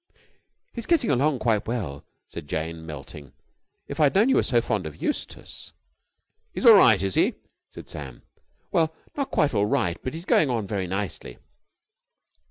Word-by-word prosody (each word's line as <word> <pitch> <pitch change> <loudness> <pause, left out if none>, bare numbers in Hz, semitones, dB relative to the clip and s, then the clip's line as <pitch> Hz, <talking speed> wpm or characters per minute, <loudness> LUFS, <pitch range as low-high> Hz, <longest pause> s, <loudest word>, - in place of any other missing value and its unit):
"He's 235 -2 -7
getting 325 -9 +2
along 140 +2 +2
quite 110 -5 0
well," 95 - -4 0.2
said 75 - -9
Jane, 80 +2 -4
melting. 75 -2 -9 0.5
"If - - -7
I 150 - +6
had 140 - +1
known 215 +6 +4
you 265 - +4
were - - +5
so - - +2
fond - - -2
of - - -9
Eustace...." - - -5 0.9
"All 230 - +10
right, 110 - +6
is 95 -1 -1
he?" - - +2 0.3
said - - -11
Sam. 65 -4 -9 0.5
"Well, 160 -1 +1 0.2
not 280 -2 -2
quite 145 -3 +1
all 105 -1 +2
right, 105 -9 0
but 130 - -5
he's 165 +2 -8
going 155 - +3
on 115 -4 -1
very 95 -2 -3
nicely." 95 -8 -5
110 Hz, 170 wpm, -25 LUFS, -, 0.9 s, All